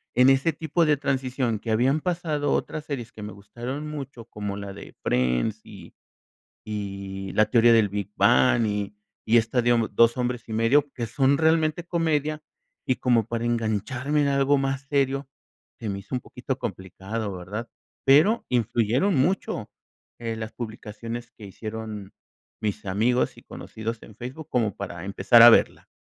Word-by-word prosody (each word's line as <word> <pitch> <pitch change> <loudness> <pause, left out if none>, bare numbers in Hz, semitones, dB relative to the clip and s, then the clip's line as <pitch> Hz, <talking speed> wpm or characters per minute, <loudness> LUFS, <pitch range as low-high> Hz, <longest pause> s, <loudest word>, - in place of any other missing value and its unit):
en 125 +1 +6
ese 135 +4 +3
tipo 165 +1 0
de 150 -1 +3
transición, 130 -4 -1
que 115 - -4
habían 130 +7 +2
pasado 155 -5 -1
otras 155 - -1
series 125 -6 -6
que 110 - -10
me 105 - -6
gustaron 120 +9 -6
mucho, 135 -6 -7
como 105 -3 -5
la 100 -1 -6
de 100 - -11
Friends 65 - 0
y 100 - -13 0.7
y 100 -2 -5
La 110 - +5
teoría 120 0 +6
del 110 -3 +5
Big 100 0 -4
Bang 120 -1 +4
y 105 -1 -2 0.3
y 115 - +3
esta, 115 +2 +2
digamos, 115 -3 +2
Dos 115 +2 +5
hombres 125 -2 -2
y - - -6
medio, 130 +6 +3
que 120 -2 -4
son 135 +3 +2
realmente 160 +1 +2
comedia, 155 -3 0 0.4
y 130 - +1
como 120 -4 +2
para 115 0 -3
engancharme 120 +5 0
en 140 - +1
algo 140 0 +3
más 135 0 -1
serio, 140 -1 0 0.5
se 110 - -5
me 100 -1 -3
hizo 125 - -5
un - - -2
poquito - - -5
complicado, 100 +3 -5
¿verdad?, 105 +7 -6 0.4
pero 160 +12 +5
influyeron 120 - +1
mucho, 165 +8 0 0.5
eh, 115 -1 -3
las 110 0 -5
publicaciones 115 +1 -7
que 110 - -14
hicieron 110 0 -7 0.5
mis 110 0 -3
amigos 110 +6 +1
y - - -15
conocidos 110 +1 -6
en 105 - -14
Facebook 135 +7 -8
como 110 -6 +1
para 85 -4 -6
empezar 100 +4 +4
a 120 - +12
verla. - - +3
120 Hz, 165 wpm, -25 LUFS, 105-135 Hz, 0.7 s, a